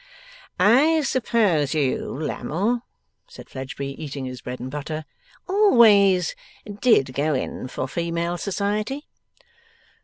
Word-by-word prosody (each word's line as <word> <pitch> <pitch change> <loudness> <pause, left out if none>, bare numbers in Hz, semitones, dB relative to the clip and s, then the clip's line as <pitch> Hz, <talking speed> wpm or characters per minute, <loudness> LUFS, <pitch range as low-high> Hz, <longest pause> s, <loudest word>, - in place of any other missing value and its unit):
'I 275 - +5
suppose 215 - +1
you, 140 -4 0
Lammle,' 190 - -2 0.5
said 485 - -14
Fledgeby, 135 +2 -6
eating 140 -2 -5
his 130 -1 -7
bread 125 0 -6
and 130 +1 -6
butter, 155 +2 -5 0.4
'always 220 - +5 0.5
did 140 - +3
go 145 +2 0
in 130 - -4
for 130 - -4
female 170 +3 -2
society? 210 - -2
170 Hz, 110 wpm, -23 LUFS, 140-225 Hz, 0.5 s, I